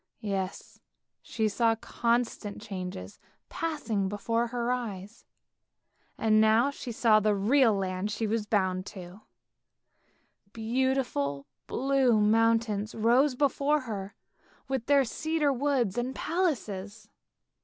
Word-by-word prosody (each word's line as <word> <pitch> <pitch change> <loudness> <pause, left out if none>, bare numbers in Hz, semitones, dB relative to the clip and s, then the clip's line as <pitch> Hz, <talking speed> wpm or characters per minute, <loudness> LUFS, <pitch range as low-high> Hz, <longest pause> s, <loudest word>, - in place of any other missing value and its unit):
Yes, 195 -2 -4 0.4
she 220 -1 -1
saw 225 +2 +2
constant 235 -2 -1
changes 180 - -7 0.3
passing 245 -12 -2
before 230 +4 -1
her 240 0 -2
eyes, 215 -4 -5 0.9
and 215 -1 +3
now 220 +5 +4
she 255 -3 -7
saw 220 -1 +4
the 210 0 +2
real 225 +3 +3
land 190 +1 -2
she 210 +2 -2
was 215 0 -1
bound 190 -3 0
to. 185 +1 -10 1.3
Beautiful 230 - -1 0.2
blue 265 -4 +2
mountains 220 0 +2
rose 245 +5 +3
before 285 +2 +1
her 205 -5 -6 0.5
with 265 -3 -3
their 280 -1 +5
cedar 305 +3 0
woods 255 -6 0
and 255 +2 -3
palaces. 215 - -2
225 Hz, 110 wpm, -28 LUFS, 205-255 Hz, 1.3 s, their